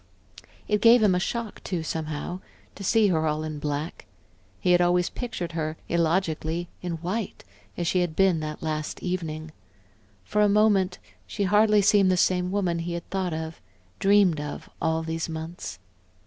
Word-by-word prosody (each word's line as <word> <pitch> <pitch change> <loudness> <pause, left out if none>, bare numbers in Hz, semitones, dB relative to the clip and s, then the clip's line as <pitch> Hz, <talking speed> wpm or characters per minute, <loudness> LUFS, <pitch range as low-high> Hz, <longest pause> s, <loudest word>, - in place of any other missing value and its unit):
It 210 -1 +1
gave 230 0 +7
him 200 -3 +5
a 180 - +2
shock, 230 +3 -4
too, 175 -4 -2
somehow 160 +2 -4 0.3
to 200 - -9
see 220 0 +4
her 160 -3 +1
all 155 0 -1
in 155 -1 -5
black; 145 - -4 0.5
he 180 - +2
had 175 0 +5
always 175 0 +2
pictured 180 -9 -4
her, 160 -1 -3
illogically, 170 0 0
in 175 -1 -3
white 185 +6 -4 0.3
as 175 - -1
she 180 +2 +2
had 175 -3 -1
been 190 -3 +3
that 155 0 -5
last 155 -1 -3
evening.... 160 -3 -3 0.7
For 210 - 0
a 210 - +5
moment 200 -3 +3 0.3
she 205 - -2
hardly 210 +1 +4
seemed 200 -1 +5
the 185 - +3
same 180 0 +2
woman 185 -4 0
he 170 +1 -3
had 170 -1 -5
thought 190 -2 -1
of, 160 0 -6 0.4
dreamed 195 -6 +4
of, 150 0 -6
all 160 0 +1
these 165 0 -3
months. 160 - -6
175 Hz, 170 wpm, -26 LUFS, 160-195 Hz, 0.7 s, gave